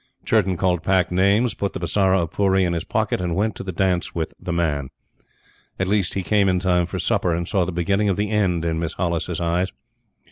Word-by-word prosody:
Churton 95 -5 +2
called 90 -2 +1
Pack 95 0 +1
names, 100 +6 +3
put 100 -1 -3
the - - -4
Bisara 95 +1 +2
of 85 - -5
Pooree 95 -1 +2
in 85 - 0
his 85 -1 -2
pocket, 110 -2 -1
and 85 -2 -1
went 110 +2 0
to - - -7
the 95 - -4
dance 90 0 0
with 80 -2 -3
The 90 - -5
Man. 75 -6 -1 0.9
At 95 - -1
least, 100 -2 0
he 95 - -1
came 100 0 +2
in 90 - +2
time 90 -2 +1
for - - -5
supper, 85 -2 +1
and 85 0 -3
saw 95 -4 +1
the 95 - -3
beginning 100 +4 +1
of 95 - 0
the 105 +1 -1
end 90 -6 +1
in 80 -1 -1
Miss 85 -1 -3
Hollis's 85 -1 -2
eyes. 85 +2 0
90 Hz, 225 wpm, -22 LUFS, 85-100 Hz, 0.9 s, names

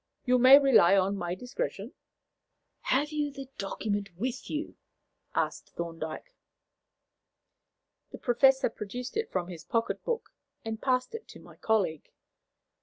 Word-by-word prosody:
You 250 0 +4
may 260 +3 +10
rely 245 -10 +6
on 195 +1 +2
my 175 -2 -3
discretion." 250 - -5 0.9
"Have 290 +4 +1
you 300 -1 -1
the 275 -1 -9
document 205 0 -2
with 255 +5 -3
you?" 305 +1 -4 0.6
asked - - -2
Thorndyke. 165 - -6 1.8
The - - -7
Professor 265 0 +3
produced 245 +6 -6
it 445 +1 -2
from 180 -2 -1
his 170 -3 -8
pocket 230 0 -1
book, 475 -1 -3 0.3
and 225 0 -4
passed 255 +3 0
it 455 -1 -7
to - - -12
my - - -15
colleague. 195 -9 0
245 Hz, 130 wpm, -29 LUFS, 195-275 Hz, 1.8 s, may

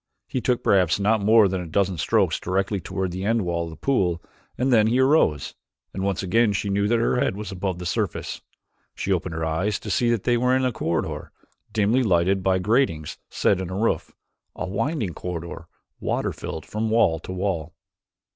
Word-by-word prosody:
He 130 - -2
took 125 -1 0
perhaps 90 -2 +3
not 105 +2 +2
more 110 0 +6
than 95 -1 -2
a 90 - -6
dozen 95 +1 0
strokes 75 - +2
directly 95 +2 -1
toward 95 +2 -3
the 95 +2 -4
end 115 +1 +1
wall 85 -1 -1
of - - -7
the 80 - -9
pool 90 - +1 0.4
and 130 +1 +2
then 110 -2 +5
he 120 +3 +2
arose; 130 - +3 0.4
and 95 - -4
once 100 0 -1
again 110 +3 +3
she 100 0 -1
knew 100 +1 +1
that 120 +2 +3
her 115 +2 +1
head 95 - +1
was 105 +1 -6
above 95 -1 -3
the 90 - -7
surface. 85 - -2 0.5
She 100 - -3
opened 90 -2 -2
her 80 0 -2
eyes 90 +6 0
to - - -6
see 120 - +2
that 115 -4 +1
they 120 -1 +2
were 125 +2 +2
in 130 0 +1
a 125 - +1
corridor 85 -7 -3 0.4
dimly 110 +4 +2
lighted 95 -3 +2
by 95 0 +2
gratings 95 - 0
set 95 -2 +1
in 90 - -4
its 95 +1 -3
roof 115 - 0 0.4
a - - -3
winding 110 - -1
corridor, 85 -1 -6 0.3
water - - -1
filled 80 - -6
from 110 +1 -2
wall 105 -8 +3
to 85 - -8
wall. 90 -4 -2
100 Hz, 205 wpm, -24 LUFS, 90-115 Hz, 0.5 s, more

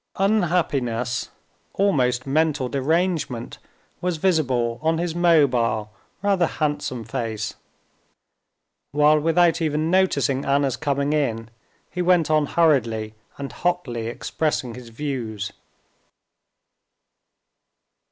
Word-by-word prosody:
Unhappiness, 150 - 0 0.4
almost 130 -11 +1
mental 150 -1 +1
derangement, 145 -2 -1 0.4
was 180 -2 -1
visible 130 -9 +1
on 160 +1 +1
his 170 0 -2
mobile, 130 -11 +2 0.3
rather 195 -4 +3
handsome 145 -6 -2
face, 110 -1 -3 1.4
while 150 +1 +5
without 165 +2 +3
even 155 +1 0
noticing 145 -8 +2
Anna's 140 -2 +1
coming 140 0 -1
in, 115 -7 -1 0.4
he 180 - -3
went 175 -3 +3
on 155 -1 +3
hurriedly 115 -11 +1 0.2
and 140 -1 -5
hotly 140 -11 -2
expressing 125 +1 -2
his 125 0 -10
views. 115 -5 -4
145 Hz, 95 wpm, -23 LUFS, 120-165 Hz, 1.4 s, while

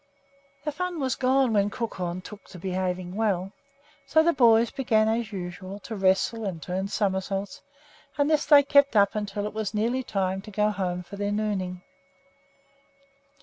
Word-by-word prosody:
The 300 - 0
fun 360 +2 -3
was 260 -3 0
gone 260 -2 +2
when 205 -1 +2
Crookhorn 185 -6 -4
took 205 0 -11
to 185 - -11
behaving 185 0 -3
well, 195 -3 0 0.6
so 315 - +4
the 340 +1 +3
boys 235 -3 +5
began 220 -5 +2
as 225 -1 -1
usual 185 +1 -6
to 225 - -6
wrestle 195 +4 +1
and 190 -5 -3
turn 185 +4 -3
somersaults; 195 -1 -2 0.6
and 285 0 +2
this 310 -1 +1
they 290 -2 +8
kept 280 -2 +4
up 200 0 +4
until 205 -1 -3
it 210 - -4
was 215 -1 -3
nearly 235 +5 0
time 190 -5 -2
to 210 - -11
go 210 +1 +1
home 180 -3 -3
for 200 +3 -10
their 205 0 -1
nooning. 190 -4 -2
205 Hz, 165 wpm, -26 LUFS, 190-235 Hz, 0.6 s, they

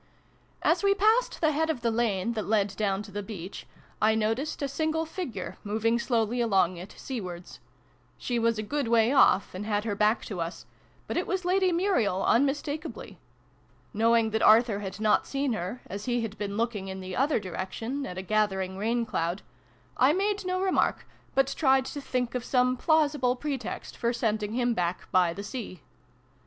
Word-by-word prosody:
As - - +3
we 395 0 +3
passed 440 +5 +2
the 315 -2 +4
head 320 +2 0
of 290 -7 -1
the 235 - +1
lane 225 -2 0
that 215 -2 -3
led 205 -2 +1
down 200 -1 0
to 205 - -12
the 205 +1 -4
beach, 195 -3 -8 0.3
I 220 +1 +4
noticed 225 +8 -1
a - - +1
single 315 +3 -1
figure, 310 - -6
moving 220 +3 +1
slowly 235 0 0
along 190 -6 +2
it, 180 +4 -10
seawards. 185 -9 -6 0.6
She 240 -2 -2
was 230 -1 +2
a 215 - -2
good 280 +4 -2
way 230 +1 +4
off, 230 -8 +4
and 185 +2 -5
had 210 -1 -1
her 215 - -1
back 210 +2 +2
to 190 -5 -4
us: 165 +2 -5 0.4
but - - -3
it - - -1
was 375 -1 -2
Lady 370 0 +3
Muriel, 335 - +1
unmistakably. 285 +4 -1 0.7
Knowing 225 0 +3
that 220 0 0
Arthur 220 -1 +5
had 195 0 -6
not 215 -1 +2
seen 275 -2 -1
her, 200 +5 -4
as 200 +1 -6
he 245 -1 0
had 220 -2 -4
been 205 -1 -4
looking, 220 -4 -1
in 190 0 -5
the 185 -1 -6
other 275 +1 +2
direction, 210 +8 -4
at 180 - -7
a 185 - -4
gathering 190 -2 0
rain 230 +3 0
cloud, 170 -2 -2 0.5
I 265 +4 +5
made 400 +1 0
no 365 0 0
remark, 380 -1 +1 0.3
but 270 0 +2
tried 265 -3 +3
to 285 - -6
think 250 -3 -2
of 250 -1 -2
some 250 0 +2
plausible 290 -3 +2
pretext 275 -1 -5
for 235 +1 0
sending 215 -3 -1
him 245 0 +1
back 175 -3 -2
by 180 -2 +4
the 200 +4 -6
sea. 205 - -7
230 Hz, 185 wpm, -28 LUFS, 205-275 Hz, 0.7 s, Arthur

